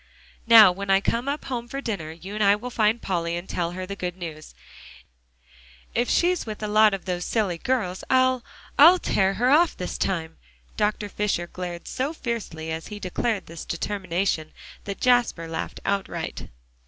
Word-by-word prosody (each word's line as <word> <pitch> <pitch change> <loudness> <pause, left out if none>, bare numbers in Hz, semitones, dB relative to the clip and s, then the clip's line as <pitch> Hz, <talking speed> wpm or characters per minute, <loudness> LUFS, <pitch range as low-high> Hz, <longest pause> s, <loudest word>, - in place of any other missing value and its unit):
"Now 225 -5 +9
when 195 +2 -6
I 195 0 +5
come 235 +6 -1
up 285 +1 -3
home 240 -2 -4
for 275 +3 -5
dinner, 200 - -4
you 175 +5 -9
and 215 0 0
I 200 0 +6
will 245 +4 -7
find 220 0 +2
Polly, 170 -2 -1
and 175 +2 -7
tell 175 -1 -2
her 185 +1 -5
the 200 +2 -6
good 180 -2 -4
news. 160 -4 -8 1.4
If 240 +1 0
she's 355 0 +2
with 215 -1 -7
a - - -1
lot 215 -1 +5
of 195 - -10
those 180 -2 -2
silly 195 -6 -1
girls, 205 -7 -1
I'll 255 -1 +3 0.4
I'll 335 +6 +9
tear 195 - +1
her 250 +3 +2
off 330 +4 +4
this 180 - -4
time." 165 -4 -2 0.4
Dr. 210 0 0
Fisher 205 -4 -1
glared 175 -1 -7
so 270 +5 -2
fiercely 215 - -4
as 160 0 -5
he 210 -1 -7
declared 205 +2 -2
this 165 0 -9
determination 175 -3 -2 0.3
that 200 -1 -5
Jasper 245 -9 +2
laughed 160 0 -5
outright. 200 -1 -3
200 Hz, 180 wpm, -25 LUFS, 175-235 Hz, 1.4 s, Now